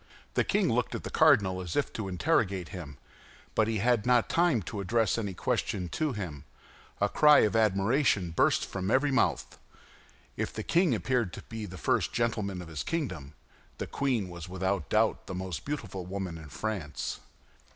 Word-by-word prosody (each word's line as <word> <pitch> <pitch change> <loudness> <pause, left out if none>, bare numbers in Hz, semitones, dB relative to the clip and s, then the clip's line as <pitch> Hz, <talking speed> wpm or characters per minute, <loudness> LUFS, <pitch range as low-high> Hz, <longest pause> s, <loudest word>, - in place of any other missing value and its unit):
The - - +2
king - - +1
looked - - 0
at - - -5
the - - -6
cardinal 95 -2 +4
as 90 -2 -5
if 145 - 0
to 110 -3 -4
interrogate 95 - 0
him; 80 -8 -8 0.6
but 110 - +2
he 115 -1 0
had 115 +1 +2
not 125 -1 +3
time 165 - +2
to 100 - -5
address 110 +1 +1
any 100 -5 -3
question 90 +1 -1
to 150 - -1
him—a 80 - -6
cry 150 +4 +6
of 105 - +2
admiration 105 - +2
burst 80 - +2
from 95 0 -4
every 135 +4 +3
mouth. 130 - 0 0.8
If - - -3
the - - -4
king 170 -6 +3
appeared 120 -3 0
to - - -8
be 110 -2 -6
the 95 0 -9
first - - 0
gentleman 105 -6 -1
of - - -11
his 80 -3 -5
kingdom, 90 - -3 0.4
the - - -3
queen 125 -8 -1
was 85 -1 -8
without 95 -3 -2
doubt - - +1
the 95 - -5
most 90 -3 -5
beautiful 105 -11 -5
woman 95 -3 -4
in 80 -2 -11
France. 80 0 -4
100 Hz, 175 wpm, -29 LUFS, 90-120 Hz, 0.8 s, cry